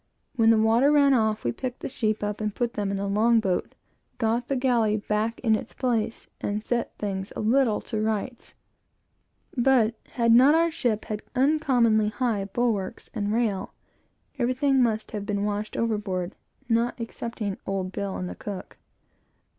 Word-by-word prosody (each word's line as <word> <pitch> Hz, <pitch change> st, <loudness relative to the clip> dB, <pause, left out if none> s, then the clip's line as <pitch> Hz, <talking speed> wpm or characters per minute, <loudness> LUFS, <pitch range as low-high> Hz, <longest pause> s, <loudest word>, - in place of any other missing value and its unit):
When 225 Hz, -3 st, +4 dB
the 225 Hz, -, +6 dB
water 225 Hz, +6 st, +4 dB
ran 285 Hz, -2 st, +5 dB
off, 220 Hz, -3 st, +1 dB
we 120 Hz, -, 0 dB
picked 250 Hz, -, -5 dB
the -, -, -3 dB
sheep 215 Hz, -5 st, -1 dB
up, 210 Hz, +1 st, -3 dB
and 210 Hz, -1 st, -2 dB
put 240 Hz, -1 st, -1 dB
them 205 Hz, -1 st, -2 dB
in 200 Hz, -, -1 dB
the 200 Hz, -, -2 dB
long 220 Hz, +4 st, +3 dB
boat, 190 Hz, -4 st, -1 dB, 0.4 s
got 235 Hz, +1 st, 0 dB
the 275 Hz, -, 0 dB
galley 240 Hz, -5 st, +2 dB
back 215 Hz, +2 st, -1 dB
in 220 Hz, -3 st, +3 dB
its -, -, -6 dB
place, 230 Hz, -3 st, -1 dB, 0.2 s
and 210 Hz, +1 st, -2 dB
set 235 Hz, +1 st, -2 dB
things 195 Hz, -2 st, -4 dB
a -, -, -4 dB
little 230 Hz, 0 st, +2 dB
to 220 Hz, -2 st, -3 dB
rights; 220 Hz, +3 st, -3 dB, 1.0 s
but, 240 Hz, -3 st, +3 dB, 0.2 s
had 235 Hz, -2 st, +2 dB
not 265 Hz, +6 st, +7 dB
our 335 Hz, +1 st, +3 dB
ship 225 Hz, -8 st, -1 dB
had 210 Hz, -1 st, -4 dB
uncommonly 250 Hz, -6 st, +3 dB
high 215 Hz, -3 st, -1 dB
bulwarks 205 Hz, -2 st, -2 dB
and 205 Hz, -2 st, -2 dB
rail, 220 Hz, -4 st, -1 dB, 0.6 s
everything 260 Hz, +2 st, +2 dB
must 220 Hz, -3 st, 0 dB
have 210 Hz, -2 st, -4 dB
been 205 Hz, -1 st, -1 dB
washed 210 Hz, +1 st, -3 dB
overboard, 205 Hz, -5 st, -1 dB, 0.3 s
not 235 Hz, +1 st, +1 dB
excepting 230 Hz, -3 st, -5 dB
Old 190 Hz, -1 st, -2 dB
Bill 200 Hz, 0 st, -3 dB
and 180 Hz, -, -4 dB
the -, -, -5 dB
cook. 195 Hz, -3 st, -8 dB
220 Hz, 170 wpm, -26 LUFS, 210-245 Hz, 1.0 s, not